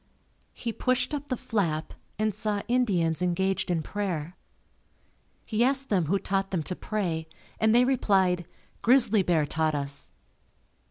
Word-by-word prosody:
He 230 -2 -4
pushed 255 +4 0
up 290 0 -4
the 255 - -1
flap 165 -10 -1 0.2
and 215 0 +1
saw 210 0 -2
Indians 185 -10 +1
engaged 190 +2 0
in 165 -3 0
prayer. 180 -5 -3 1.1
He 225 +1 +1
asked 270 +1 +1
them 185 -5 +2
who 190 +7 +2
taught 195 0 -1
them 175 -5 -1
to 180 - -4
pray 175 -8 -2 0.3
and 220 +1 +4
they 245 +1 +6
replied 190 -9 +2 0.3
"Grizzly 235 -4 +4
Bear 170 -5 +2
taught 155 +1 0
us." 140 0 -4
195 Hz, 145 wpm, -27 LUFS, 170-225 Hz, 1.1 s, they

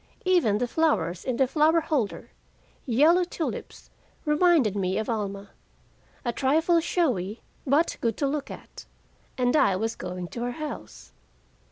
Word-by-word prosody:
Even 345 - +3
the 245 +3 -1
flowers 265 - 0
in 255 -3 -2
the 265 - +4
flower 310 +5 +3
holder, 300 -9 -2 0.6
yellow 305 +9 +4
tulips, 345 -2 -6 0.3
reminded 300 - +3
me 190 -1 0
of 220 - -2
Alma 200 -2 -4 0.7
a 240 - 0
trifle 320 +7 +2
showy, 245 - -1 0.2
but 290 +5 +2
good 230 -3 0
to 280 - 0
look 280 0 -3
at! - - -11 0.5
And 250 +1 +2
I 195 -10 +4
was 225 +4 -2
going 180 -1 -6
to 235 - -6
her 245 0 -2
house! 305 +2 -8
255 Hz, 145 wpm, -26 LUFS, 210-315 Hz, 0.7 s, the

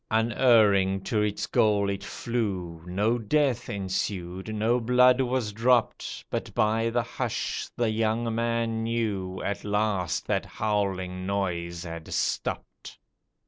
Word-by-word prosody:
Unerring 110 -4 +4
to 105 +2 0
its 105 -1 -1
goal 105 -4 +2
it 100 0 -3
flew, 95 -9 -3
No 105 +6 +1
death 135 +2 +1
ensued, 95 0 -3
no 110 +3 +1
blood 125 +2 +5
was 125 -4 -1
dropped, 120 +2 +1
But - - -3
by 110 +2 +2
the 120 +1 0
hush - - -3
the 120 -2 +1
young 115 +1 0
man 115 -1 0
knew 105 -5 -2
At 100 - -3
last 105 -4 0
that - - 0
howling 95 -3 -2
noise 85 -3 -2
had 85 -2 -7
stopped. - - -3
105 Hz, 125 wpm, -27 LUFS, 95-115 Hz, -, blood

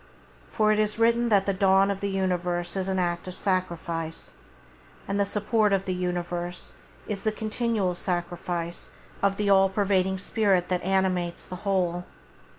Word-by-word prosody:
For 215 -1 +3
it 215 - +2
is 215 0 +1
written 235 +1 +3
that 200 -3 +4
the 200 - +1
dawn 195 +1 +4
of 195 - -3
the 200 - -2
universe 180 -2 -1
is 190 -1 -1
an 190 -1 0
act 175 -1 -1
of 185 - -5
sacrifice, 170 -3 -2 0.7
and 200 +1 -1
the 200 - +2
support 210 +1 +1
of 195 0 +1
the 185 - -1
universe 175 -1 -3 0.3
is 205 -2 -3
the 215 - +1
continual 215 -3 -1
sacrifice 175 -1 -3 0.3
of 195 0 +2
the 205 -1 +1
all 195 0 +6
pervading 190 -1 +1
Spirit 190 -2 +1
that 180 -1 0
animates 185 -2 0
the 180 - -7
whole. 180 -3 0
190 Hz, 160 wpm, -26 LUFS, 180-200 Hz, 0.7 s, all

